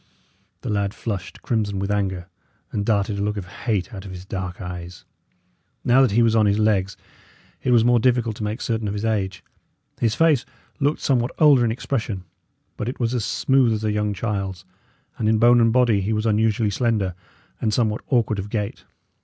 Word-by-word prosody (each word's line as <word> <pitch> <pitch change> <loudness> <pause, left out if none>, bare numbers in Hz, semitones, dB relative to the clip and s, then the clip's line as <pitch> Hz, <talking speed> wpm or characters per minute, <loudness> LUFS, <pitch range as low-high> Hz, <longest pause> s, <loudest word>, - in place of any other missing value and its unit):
The - - -5
lad 100 -1 -1
flushed 100 -6 -5
crimson 105 -4 -1
with 100 +1 -2
anger, 95 -3 -1 0.4
and 100 - -1
darted 100 -1 0
a - - -1
look 105 +1 -1
of 100 - -4
hate 105 +3 -3
out 95 -2 -7
of 100 - -9
his 90 0 -8
dark 95 -2 -5
eyes. 90 -1 -8 0.8
Now 125 +2 +5
that 130 - +5
he 120 +2 +4
was 115 -1 +3
on 110 -2 +4
his 100 0 +2
legs, 100 -3 +1 0.6
it - - -1
was 120 -2 +5
more 120 0 +4
difficult 120 -2 +1
to - - -5
make 105 +3 -3
certain 115 -2 -1
of 100 - -3
his 105 +2 -3
age. 95 -4 -1 0.6
His 115 -2 +1
face 155 -6 +3 0.4
looked 145 +2 +1
somewhat 125 -3 +1
older 145 -5 +6
in 115 - +2
expression, 110 -5 -3 0.5
but 105 - -2
it 125 - -6
was 120 -1 0
as 120 -4 -1
smooth 130 -4 +2
as 110 0 -3
a 110 - +1
young 105 0 0
child's; 95 -3 -3 0.5
and 110 - +1
in 110 - +3
bone 120 +2 +6
and 115 -1 +4
body 120 -4 +3
he 105 +4 -1
was 110 +1 -1
unusually 110 0 +2
slender, 105 -4 0 0.5
and 110 - +1
somewhat 110 -1 0
awkward 115 -5 +1
of 100 +2 -5
gait. 105 -2 -4
110 Hz, 200 wpm, -23 LUFS, 100-120 Hz, 0.8 s, older